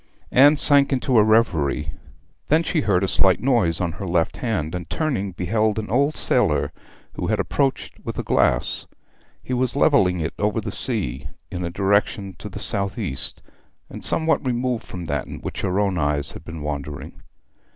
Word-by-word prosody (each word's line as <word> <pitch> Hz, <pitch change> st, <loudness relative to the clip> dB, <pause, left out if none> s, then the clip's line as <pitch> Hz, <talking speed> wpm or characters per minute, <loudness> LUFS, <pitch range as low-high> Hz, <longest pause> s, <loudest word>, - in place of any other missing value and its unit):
Anne 145 Hz, +4 st, +6 dB
sank 140 Hz, -1 st, +5 dB
into 130 Hz, -1 st, 0 dB
a -, -, +6 dB
reverie. 80 Hz, -10 st, +2 dB, 0.5 s
Then 160 Hz, +3 st, +3 dB
she 160 Hz, -1 st, 0 dB
heard 100 Hz, -7 st, +2 dB
a -, -, +1 dB
slight 95 Hz, -1 st, +3 dB
noise 115 Hz, -11 st, +2 dB
on 90 Hz, -2 st, -1 dB
her 95 Hz, +4 st, -6 dB
left 85 Hz, -1 st, 0 dB
hand, 95 Hz, -10 st, -2 dB
and 85 Hz, -3 st, -5 dB
turning 100 Hz, -, -1 dB
beheld 105 Hz, +5 st, 0 dB
an 110 Hz, -1 st, -4 dB
old 140 Hz, +5 st, +2 dB
sailor, -, -, +2 dB, 0.4 s
who -, -, -3 dB
had -, -, 0 dB
approached 135 Hz, -2 st, -1 dB
with -, -, -5 dB
a -, -, -2 dB
glass. -, -, +1 dB, 0.6 s
He 130 Hz, -, -4 dB
was 125 Hz, 0 st, 0 dB
levelling 100 Hz, -, +3 dB
it 80 Hz, 0 st, -2 dB
over 105 Hz, +2 st, +1 dB
the 105 Hz, -1 st, -4 dB
sea 75 Hz, -, -3 dB, 0.2 s
in 90 Hz, 0 st, -4 dB
a 85 Hz, -, -2 dB
direction 100 Hz, +1 st, 0 dB
to 105 Hz, -, -7 dB
the 100 Hz, -, -9 dB
south 100 Hz, -1 st, -1 dB
east, 90 Hz, -, -4 dB, 0.5 s
and -, -, -8 dB
somewhat 160 Hz, -2 st, +1 dB
removed 125 Hz, -2 st, -1 dB
from 90 Hz, -2 st, -7 dB
that 75 Hz, -4 st, -2 dB
in -, -, -7 dB
which -, -, -5 dB
her 95 Hz, 0 st, 0 dB
own 95 Hz, -4 st, +1 dB
eyes 75 Hz, -1 st, 0 dB
had -, -, -10 dB
been 80 Hz, -2 st, -8 dB
wandering. 75 Hz, -1 st, -6 dB
100 Hz, 180 wpm, -22 LUFS, 85-125 Hz, 0.6 s, Anne